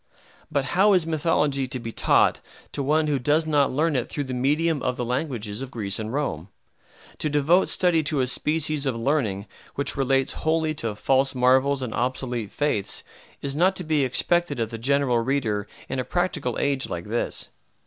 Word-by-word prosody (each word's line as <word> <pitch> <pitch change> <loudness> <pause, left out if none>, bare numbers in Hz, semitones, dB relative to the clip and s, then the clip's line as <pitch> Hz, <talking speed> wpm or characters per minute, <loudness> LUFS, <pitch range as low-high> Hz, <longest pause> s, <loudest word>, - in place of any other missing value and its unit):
But 140 -3 0
how 200 +3 +5
is 180 -4 +3
mythology 150 -4 +1
to 130 - -4
be 115 -2 -6
taught - - +3 0.3
to 145 - -3
one 155 +3 +2
who 145 -2 0
does 150 +5 +2
not 145 -3 +2
learn 150 +3 +1
it 125 - -1
through 145 - -3
the 130 -2 -5
medium 145 +4 +1
of 125 -1 -1
the 120 - -2
languages 120 -4 -3
of 135 - -5
Greece 105 -5 -4
and 110 0 -4
Rome? 120 - -2 0.7
To 155 - 0
devote 150 +6 +3
study 175 -3 +3
to 145 -1 0
a 130 - +2
species 150 +2 +1
of 130 - 0
learning 115 -6 0 0.3
which 140 - -2
relates 135 0 +1
wholly 160 0 +1
to 115 -8 -3
false 135 +4 +1
marvels 130 +2 +3
and 120 - -4
obsolete 120 -3 -2
faiths 145 -10 -1 0.4
is 140 0 -2
not 185 +5 +3
to 180 - -4
be 155 -3 +1
expected 175 +4 +1
of 115 0 -1
the 115 - -6
general 135 -1 +2
reader 115 -5 -1 0.2
in 135 - -3
a - - 0
practical 175 -7 -1
age 140 -2 0
like 85 0 -5
this. 115 +3 -1
135 Hz, 190 wpm, -24 LUFS, 125-155 Hz, 0.7 s, how